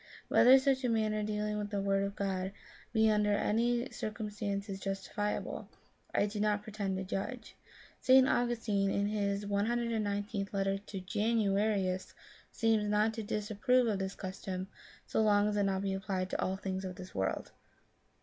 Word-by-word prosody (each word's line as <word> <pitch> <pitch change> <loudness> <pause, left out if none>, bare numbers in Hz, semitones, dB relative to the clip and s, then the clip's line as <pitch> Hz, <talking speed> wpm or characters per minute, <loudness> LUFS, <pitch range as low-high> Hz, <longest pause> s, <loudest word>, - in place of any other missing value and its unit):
Whether 260 +2 +8
such 265 0 +2
a 250 - +1
manner 215 -2 +1
of 210 - -2
dealing 210 0 -1
with 205 0 -3
the 205 -1 -1
Word 195 0 +1
of 200 0 -3
God 190 -1 -2 0.4
be 220 -1 +4
under 210 -1 +2
any 235 +4 +1
circumstances 205 -2 -4
justifiable, 195 +1 -3 0.4
I - - +2
do 210 0 -4
not 210 -1 +1
pretend 200 -3 -3
to 190 - -3
judge. 220 +5 -5 0.4
St. 260 0 +6
Augustine 225 -6 +1
in 200 +1 +1
his 205 -1 -1
1 200 +1 0
19th 215 -4 -1
letter 195 0 0
to 195 -1 -7
Janu 205 +1 +1
arius 190 -4 -1 0.4
seems 225 -2 +2
not 210 +1 +2
to 225 - -4
disapprove 215 +4 +1
of 210 -4 0
this 190 0 -3
custom, 185 0 -5 0.4
so - - 0
long 205 -1 +4
as 210 - 0
it - - +1 0.2
be 195 -1 0
not - - -1
applied 190 -2 -2
to 190 +1 -1
things 190 0 -2
of 185 -1 -5
this 185 0 -10
world. 95 0 -2
205 Hz, 170 wpm, -32 LUFS, 195-220 Hz, 0.4 s, Whether